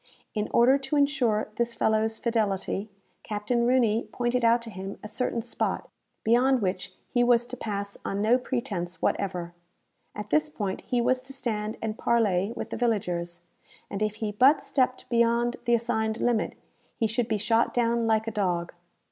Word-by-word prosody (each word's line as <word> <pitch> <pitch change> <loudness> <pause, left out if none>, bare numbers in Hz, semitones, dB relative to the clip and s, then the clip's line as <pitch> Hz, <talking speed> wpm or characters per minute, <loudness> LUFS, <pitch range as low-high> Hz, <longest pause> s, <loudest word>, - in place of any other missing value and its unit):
In 210 -1 -2
order 260 +4 +5
to 270 +2 -3
insure 260 -8 +2
this 235 0 -1
fellow's 220 0 +1
fidelity, 215 -3 -1 0.3
Captain 220 +3 -1
Rooney 235 -3 +2
pointed 245 0 0
out 230 +1 +4
to 230 - -8
him 190 +1 -6
a - - -5
certain 235 0 -2
spot, - - -3 0.3
beyond 250 +4 +4
which 185 -2 -3 0.2
he 245 - +4
was 240 -1 +4
to 250 - -7
pass 200 -4 -4
on 195 - -2
no 225 +5 +4
pretence 190 -10 -3
whatever. 180 -3 -1 0.6
At 210 0 -7
this 305 0 +3
point 205 -9 -3
he 245 -1 +1
was 255 +2 +2
to 265 +1 -9
stand 220 -4 -3
and 220 -1 -3
parley 205 -4 +2
with - - -5
the - - -3
villagers, 175 -7 -1 0.5
and 200 - -4
if 215 -1 0
he 220 -1 -3
but 260 +8 +5
stepped 255 -2 0
beyond 235 +1 +2
the 240 - +4
assigned 220 -1 -1
limit, 235 -3 +1 0.4
he 225 - +1
should 225 +2 0
be 220 - 0
shot 225 +3 +2
down 235 -1 +1
like 220 0 +2
a - - -1
dog. 180 -5 -1
225 Hz, 175 wpm, -27 LUFS, 210-240 Hz, 0.6 s, order